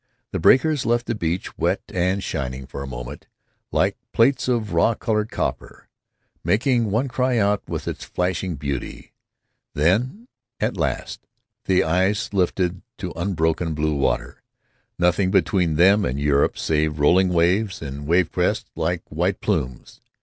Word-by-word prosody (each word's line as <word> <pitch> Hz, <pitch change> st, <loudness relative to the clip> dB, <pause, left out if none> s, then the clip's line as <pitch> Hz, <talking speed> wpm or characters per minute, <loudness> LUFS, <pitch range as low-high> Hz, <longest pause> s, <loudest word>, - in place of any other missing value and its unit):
The -, -, -2 dB
breakers 145 Hz, +1 st, +4 dB
left 120 Hz, +1 st, +1 dB
the 120 Hz, -, -1 dB
beach 85 Hz, -3 st, -3 dB
wet -, -, +1 dB
and 90 Hz, +2 st, 0 dB
shining 65 Hz, -4 st, -4 dB
for 70 Hz, +1 st, -7 dB
a 70 Hz, -, -5 dB
moment, -, -, -8 dB, 0.4 s
like -, -, +1 dB, 0.2 s
plates 130 Hz, +4 st, +3 dB
of 115 Hz, -6 st, 0 dB
raw 95 Hz, +7 st, +3 dB
colored 105 Hz, -1 st, -1 dB
copper, -, -, -4 dB, 0.5 s
making 115 Hz, -, +2 dB
one 115 Hz, +7 st, +1 dB
cry 125 Hz, 0 st, 0 dB
out 100 Hz, -1 st, +2 dB
with -, -, -4 dB
its -, -, -4 dB
flashing 90 Hz, 0 st, -2 dB
beauty. 70 Hz, -2 st, -5 dB, 0.6 s
Then, 120 Hz, -, +1 dB, 0.3 s
at -, -, 0 dB
last, -, -, -3 dB, 0.4 s
the 95 Hz, -1 st, +3 dB
eyes 95 Hz, +7 st, 0 dB
lifted 90 Hz, -1 st, 0 dB, 0.2 s
to -, -, -5 dB
unbroken 80 Hz, -3 st, 0 dB
bluewater—nothing 75 Hz, +5 st, -2 dB
between 95 Hz, -4 st, +2 dB
them 95 Hz, +6 st, +5 dB
and 65 Hz, -3 st, -1 dB
Europe 70 Hz, -1 st, +2 dB
save 75 Hz, -1 st, 0 dB
rolling 90 Hz, +6 st, +4 dB
waves 90 Hz, +4 st, +1 dB
and 70 Hz, -1 st, -6 dB
wave 85 Hz, +1 st, +3 dB
crests -, -, -1 dB
like 85 Hz, +2 st, -1 dB
white 90 Hz, +5 st, -1 dB
plumes. 65 Hz, -1 st, -3 dB
90 Hz, 140 wpm, -22 LUFS, 80-105 Hz, 0.6 s, them